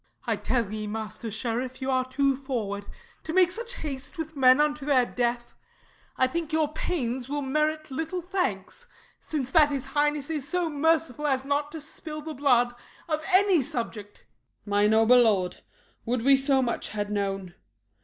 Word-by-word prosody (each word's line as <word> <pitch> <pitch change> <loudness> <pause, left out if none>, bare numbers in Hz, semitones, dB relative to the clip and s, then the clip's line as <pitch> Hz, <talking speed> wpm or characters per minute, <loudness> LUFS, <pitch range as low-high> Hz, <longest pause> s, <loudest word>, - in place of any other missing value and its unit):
I - - +1
tell 230 -5 -1
ye, 215 -1 -4
Master 220 +1 -5
Sheriff, 245 +4 -3
you 265 0 -2
are 255 0 0
too 275 +1 +2
forward, 225 -7 -4 0.4
To 320 - -5
make 365 -1 +5
such 470 +5 -5
haste 280 +2 -4
with 320 -1 -5
men 255 0 +6
unto 300 -1 +1
their 270 -3 +3
death; 240 0 -2 0.6
I 260 - +4
think 325 +4 -3
your 315 -1 +2
pains 255 -7 -2
will 290 0 -2
merit 305 +2 -1
little 325 +6 -3
thanks, 360 - -3 0.3
Since 275 -5 -4
that 310 -4 +6
his 280 -2 -3
highness 295 +1 0
is 295 -4 -3
so 350 0 0
merciful 300 -1 +1
As 265 -1 0
not 285 +1 -1
to 320 - -6
spill 305 0 -7
the 315 0 -5
blood 245 -4 +3 0.3
of 310 -1 -1
any 375 -3 +5
subject. 225 -4 -4
SHERIFF. - - -28 0.4
My 205 0 +3
noble 225 +3 +6
lord, 195 -6 +1 0.4
would 240 0 -1
we 275 +1 +7
so 270 0 +2
much 235 - -2
had 205 -1 -3
known! 195 -3 -2
270 Hz, 175 wpm, -27 LUFS, 235-305 Hz, 0.6 s, we